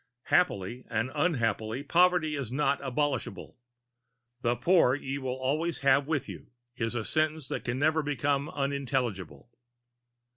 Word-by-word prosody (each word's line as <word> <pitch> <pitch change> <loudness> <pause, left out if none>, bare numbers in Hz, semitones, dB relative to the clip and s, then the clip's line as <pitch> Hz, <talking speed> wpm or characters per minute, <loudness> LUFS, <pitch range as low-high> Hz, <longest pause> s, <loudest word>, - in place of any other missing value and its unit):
Happily 125 - +2
and 115 +4 -1
unhappily 115 - 0
poverty 170 0 +3
is 135 -5 -4
not 140 +1 +1
abolishable: 135 -5 -2 0.8
"The 120 -1 +1
poor 135 0 +4
ye 135 -1 -5
have 135 - -8
always 135 +6 -1 0.2
with 150 -4 -1
you" - - -9 0.3
is 115 0 -2
a 115 - -1
sentence 155 -2 0
that - - -3
can 120 +1 -1
never 155 +3 +2
become 145 0 -1
unintelligible. 125 - -3
140 Hz, 125 wpm, -29 LUFS, 120-150 Hz, 0.8 s, poor